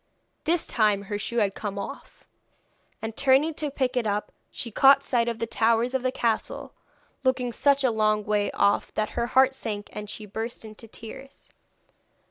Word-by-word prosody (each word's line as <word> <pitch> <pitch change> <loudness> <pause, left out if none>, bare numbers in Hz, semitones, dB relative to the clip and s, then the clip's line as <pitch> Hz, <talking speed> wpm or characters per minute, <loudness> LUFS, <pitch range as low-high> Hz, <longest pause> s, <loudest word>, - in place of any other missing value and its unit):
This 335 +2 +2
time 210 -3 +2
her 205 +1 -4
shoe 235 +3 -3
had 205 -4 +2
come 200 -1 -5
off, 200 +8 -8 0.8
and 220 0 -4
turning 275 +5 +3
to 300 0 -3
pick 265 -2 -1
it 240 -3 +1
up 205 0 -2 0.2
she 235 - -7
caught 275 +4 +6
sight 240 -3 +1
of 235 -1 -2
the 230 - -2
towers 230 +2 +1
of 265 - 0
the 255 0 0
castle, 230 -3 -2 0.5
looking 255 -2 +1
such 280 +3 +3
a 255 - +3
long 215 -1 +1
way 210 -1 +1
off 200 - +2
that 215 - 0
her 235 - -1
heart 265 +1 +4
sank, 210 -6 -5
and 210 -1 -6
she 210 0 -6
burst 225 +3 -6
into 215 +1 -11
tears. 250 +5 -11
230 Hz, 180 wpm, -26 LUFS, 215-260 Hz, 0.8 s, caught